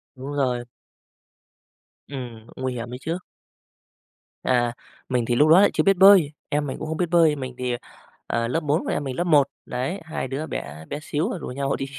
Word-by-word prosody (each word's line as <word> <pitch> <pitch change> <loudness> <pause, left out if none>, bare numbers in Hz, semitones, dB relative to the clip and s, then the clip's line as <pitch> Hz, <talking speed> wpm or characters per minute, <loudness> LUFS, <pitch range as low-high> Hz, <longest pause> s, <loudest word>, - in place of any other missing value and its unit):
Đúng 135 +3 -6
rồi. 125 -4 0 1.4
Ừm, 120 -5 -7
nguy 130 -1 -2
hiểm 120 0 -5
ấy - - -4
chứ. 165 +2 -2 1.3
À, 120 -2 +2 0.4
mình 125 -2 +1
thì 120 +1 +1
lúc 150 +4 +5
đó 175 +4 +8
lại 205 - +5
chưa - - +2
biết 195 -1 +4
bơi, 190 -6 +7 0.2
em 145 0 0
mình 130 - -4
cũng - - -5
không 160 - -3
biết 175 -1 0
bơi. 165 -3 +5
Mình 130 -2 -6
thì, 125 -1 -1 0.5
à, 115 0 0
lớp 160 +7 0
4, 150 0 0
còn - - -1
em 145 - -1
mình 130 -2 -4
lớp 175 - 0
1. 150 -5 +5 0.2
Đấy, 130 +11 -3
hai 160 -4 -4
đứa 140 +5 -4
bé 75 +3 -6
bé 145 - -3
xíu 160 +7 -1
rồi 185 - -4
rủ - - -6
nhau 140 +2 -1
đi 135 - -3
140 Hz, 210 wpm, -24 LUFS, 125-160 Hz, 1.4 s, đó